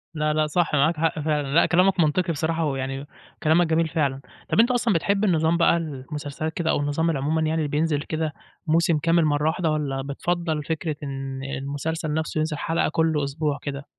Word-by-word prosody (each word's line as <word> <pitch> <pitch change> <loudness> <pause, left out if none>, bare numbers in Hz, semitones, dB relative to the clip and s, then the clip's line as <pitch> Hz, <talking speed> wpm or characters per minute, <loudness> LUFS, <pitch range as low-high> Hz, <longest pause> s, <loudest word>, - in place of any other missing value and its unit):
لأ، 155 -1 0
لأ، 155 0 +1
صح 165 +1 0
معاك 155 +3 +3
حق 160 0 0
فعلًا، 150 -1 0
لأ 170 - +5
كلامك 185 +2 +3
منطقي 170 +2 +2
بصراحة، 160 +2 -1
ويعني 135 -1 -3 0.4
كلامك 160 +2 +4
جميل 160 +1 +2
فعلًا، 140 -5 -1 0.3
طب - - +1
أنت 235 +3 +5
أصلًا 240 -3 +2
بتحب 200 +4 +1
النظام 165 -3 +2
بقى 170 0 +4
المسلسلات 150 0 -5
كده 170 -2 -2
أو - - +2
النظام 145 +3 0
العمومًا 155 +1 0
يعني 160 -1 0
بينزل 150 0 0
كده 155 0 -3 0.3
موسم 165 0 +3
كامل 165 +2 +2
مرّة 150 0 +1
واحدة، 160 0 0
والّا 140 -3 -1
بتفضّل 160 +3 -2
فكرة 160 0 -2
إن 135 -1 -5
المسلسل 145 +3 -3
نفسه 155 0 -2
ينزل 155 -1 -1
حلقة 165 +2 0
كل 160 -2 +1
أسبوع 145 +1 -1
كده؟ 140 0 -5
155 Hz, 185 wpm, -24 LUFS, 145-165 Hz, 0.4 s, لأ